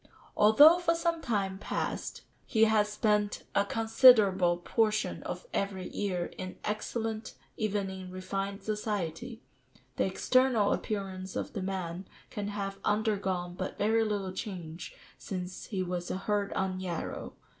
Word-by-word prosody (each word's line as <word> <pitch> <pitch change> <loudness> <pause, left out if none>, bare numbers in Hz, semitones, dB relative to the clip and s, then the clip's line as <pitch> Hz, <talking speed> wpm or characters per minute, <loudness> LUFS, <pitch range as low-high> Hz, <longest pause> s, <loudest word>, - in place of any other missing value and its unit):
] - - -24
"Although 290 +11 +8
for 335 -1 +2
some 335 -1 0
time 195 -7 -1
past - - -3 0.2
he 225 -3 +3
has 215 -1 +4
spent 210 -1 +1
a 200 - +3
considerable 210 -5 +5
portion 215 +4 0
of - - -6
every 190 -2 -2
year 180 -4 -2
in 185 0 -5
excellent, 220 +1 -3 0.2
even 205 -2 -1
in 190 -1 -7
refined 195 +2 -4
society, 210 0 -3 0.5
the - - +2
external 255 -5 +3
appearance 190 -3 -4
of - - -3
the 200 - -3
man 185 -1 -4 0.2
can 205 -1 -4
have 200 -1 -4
undergone 195 -4 0
but 185 +1 -5
very 225 +2 +3
little 200 -3 -2
change 175 -5 -6 0.2
since 185 -1 -5
he 190 -4 -2
was 180 -1 -3
'a - - -2
herd 205 +1 -1
on 190 -1 -1
Yarrow. 175 -3 -4
200 Hz, 140 wpm, -30 LUFS, 185-215 Hz, 0.5 s, Although